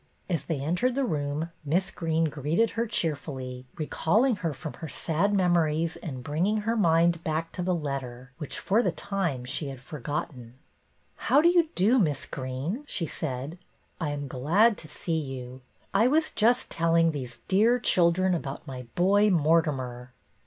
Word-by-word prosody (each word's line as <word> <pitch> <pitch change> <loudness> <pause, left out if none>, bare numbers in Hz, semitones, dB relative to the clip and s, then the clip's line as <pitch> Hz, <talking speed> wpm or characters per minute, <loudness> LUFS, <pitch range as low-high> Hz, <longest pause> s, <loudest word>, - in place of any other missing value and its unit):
As 170 -4 -2
they 160 -4 -1
entered 180 - 0
the 275 - +1
room 150 -2 -2
Miss 180 +6 0
Greene 165 -1 0
greeted 155 - 0
her 230 +1 -1
cheerfully, 130 -8 -3
recalling 210 - +1
her 170 -4 -2
from 140 +2 -7
her 160 - -5
sad 170 +8 0
memories 170 -4 +2
and 130 -6 -7
bringing 185 - 0
her 225 +2 0
mind 170 -4 +3
back 160 +1 -2
to 180 - -4
the 180 0 +1
letter 135 -5 -5
which, 150 - -5
for 215 +5 +2
the - - +1
time, 170 -11 -2
she 140 +3 -3
had 135 -2 -7
for 140 +4 -9
gotten. 125 -3 -5 0.3
" - - -39
How 280 - +6
do 335 +3 +6
you 345 -2 +3
do. 220 +8 +4
Miss 150 - +1
Greene? 135 - -4
" - - -33
she 180 -10 -1
said. 145 +2 -4 0.2
" - - -24
I 155 - 0
am 145 -1 -4
glad 170 - +3
to 155 - -9
see 160 +2 -2
you. 130 -3 -7 0.3
I 220 +5 +4
was 310 +4 +2
just 240 +3 +2
telling 165 0 +3
these 130 -5 -7
dear 220 +6 +4
children 185 -4 +3
about 145 -5 -4
my 130 -4 -7
boy 200 +4 +4
Mortimer." 145 -8 +1
165 Hz, 175 wpm, -27 LUFS, 140-190 Hz, 0.3 s, How